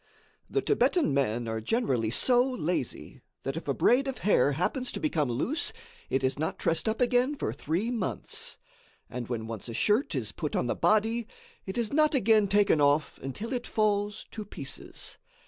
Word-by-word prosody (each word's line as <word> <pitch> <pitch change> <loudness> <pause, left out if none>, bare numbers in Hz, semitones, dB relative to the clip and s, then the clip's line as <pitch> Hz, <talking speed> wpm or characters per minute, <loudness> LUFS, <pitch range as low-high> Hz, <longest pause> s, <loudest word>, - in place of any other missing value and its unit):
The - - +1
Thibetan 345 - +2
men 120 -4 0
are 110 0 -2
generally 125 - 0
so 245 - +4
lazy, 180 - -3 0.2
that 135 +1 -3
if 165 - -6
a 140 - +2
braid 270 +3 +3
of 265 - -3
hair 170 -8 +4
happens 245 - -1
to - - -3
become 155 - 0
loose, 250 - 0 0.4
it 135 - 0
is 130 +2 0
not 160 - -1
tressed 165 +7 0
up 220 - -2
again 250 +3 +3
for 115 - -2
three 165 - -1
months, 225 -6 -3 0.5
and 125 -2 -4
when 115 -3 -3
once 115 0 -6
a 115 - -5
shirt 220 - +2
is - - -2
put - - -4
on - - +1
the - - 0
body, 225 +2 +2 0.4
it 190 - -4
is 235 -1 -1
not 305 0 +4
again 220 -4 +4
taken 200 -6 +3
off 145 +1 +2
until 205 - -5
it 245 -1 -3
falls 210 -1 0
to 215 - -5
pieces. 140 -9 -8
205 Hz, 180 wpm, -29 LUFS, -, 0.5 s, so